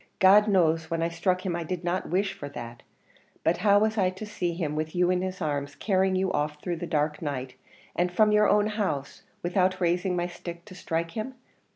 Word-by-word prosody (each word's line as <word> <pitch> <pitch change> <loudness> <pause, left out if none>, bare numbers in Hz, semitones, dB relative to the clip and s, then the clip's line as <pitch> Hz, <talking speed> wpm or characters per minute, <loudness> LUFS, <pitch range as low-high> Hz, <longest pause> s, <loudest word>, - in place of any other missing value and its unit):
God 205 +2 +6
knows 165 -5 +2
when 165 0 -1
I 165 - +1
struck 180 +3 0
him 180 -2 -1
I 170 - -2
did 180 +1 -4
not 175 +2 -1
wish 190 +3 +1
for 145 - -7
that; 120 -3 -8 0.6
but 165 - +2
how 200 +1 +4
was 215 +1 +2
I 185 -2 +3
to 185 +3 -7
see 180 -5 -2
him 155 -4 -2
with 155 +2 -3
you 180 0 +3
in 180 0 +1
his 185 -1 -3
arms 145 -1 -2
carrying 190 -2 +1
you 190 0 +1
off 150 0 -1
through 175 +1 -3
the 175 - -5
dark 150 -1 0
night, 130 -4 -4 0.4
and 180 +1 +1
from 210 +4 +4
your 210 0 +4
own 205 0 +4
house, 195 -11 -2 0.2
without 185 +1 +1
raising 180 +1 +1
my 175 0 0
stick 170 -1 -8
to 205 - -12
strike 165 -2 -3
him? 240 +6 -5
180 Hz, 220 wpm, -27 LUFS, 160-190 Hz, 0.6 s, God